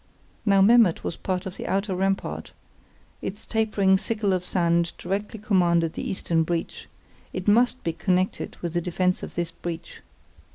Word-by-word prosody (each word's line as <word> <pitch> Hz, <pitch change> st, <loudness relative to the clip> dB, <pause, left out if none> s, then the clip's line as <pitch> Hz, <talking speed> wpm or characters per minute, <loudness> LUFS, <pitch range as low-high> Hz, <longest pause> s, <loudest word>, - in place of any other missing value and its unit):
Now 195 Hz, -1 st, +6 dB
Memmert 225 Hz, -4 st, +5 dB
was -, -, -3 dB
part 185 Hz, -1 st, -3 dB
of 190 Hz, 0 st, -6 dB
the -, -, -5 dB
outer 195 Hz, 0 st, 0 dB
rampart; 195 Hz, +1 st, -2 dB, 0.7 s
its 200 Hz, +2 st, -6 dB
tapering 205 Hz, -4 st, +2 dB
sickle 215 Hz, -3 st, 0 dB
of 180 Hz, -1 st, 0 dB
sand 170 Hz, -2 st, +1 dB
directly 205 Hz, +4 st, -3 dB
commanded 175 Hz, -5 st, +2 dB
the -, -, -4 dB
eastern 170 Hz, -3 st, 0 dB
breach; 165 Hz, +1 st, -3 dB, 0.5 s
it 185 Hz, +1 st, -5 dB
must 240 Hz, +4 st, +3 dB
be 165 Hz, -, -1 dB
connected 185 Hz, +1 st, -1 dB
with 170 Hz, -2 st, -2 dB
the 175 Hz, -, +1 dB
defence 180 Hz, +1 st, 0 dB
of -, -, -8 dB
this 170 Hz, -1 st, -2 dB
breach. 165 Hz, -1 st, -7 dB
185 Hz, 160 wpm, -25 LUFS, 175-200 Hz, 0.7 s, Now